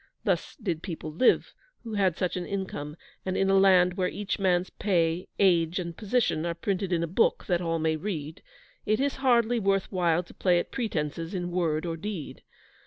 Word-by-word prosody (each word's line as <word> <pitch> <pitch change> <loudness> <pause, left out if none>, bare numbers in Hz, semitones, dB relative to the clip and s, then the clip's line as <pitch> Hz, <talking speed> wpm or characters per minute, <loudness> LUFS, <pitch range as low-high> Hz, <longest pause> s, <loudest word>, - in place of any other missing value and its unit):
Thus - - -1
did 180 - -3
people 160 -4 -6
live 210 +11 +3 0.3
who 225 -2 -6
had 190 -5 +1
such 180 - -1
an 180 - -2
income; 185 -7 -4 0.3
and 185 -1 -2
in 195 0 +2
a 195 - +5
land 180 -2 +5
where 185 -1 +1
each 205 +2 -3
man's 185 -2 +1
pay, 170 -3 0
age, 175 -3 +3
and 170 -2 -4
position 215 -6 0
are 170 0 -2
printed 190 +2 -2
in 170 -1 +1
a - - -1
book, 185 +8 +1
that 175 -2 +1
all 165 -1 0
may 160 0 +1
read, 155 -3 -5 0.4
it 215 0 +1
is 280 +1 0
hardly 245 -3 +3
worth 195 -2 +1
while 175 -2 +2
to - - -16
play 180 -2 +2
at 175 - -2
pretences 165 - -3
in 175 -1 -3
word 165 -3 0
or 165 -1 -3
deed. 185 -4 -6
180 Hz, 195 wpm, -27 LUFS, 165-200 Hz, 0.4 s, a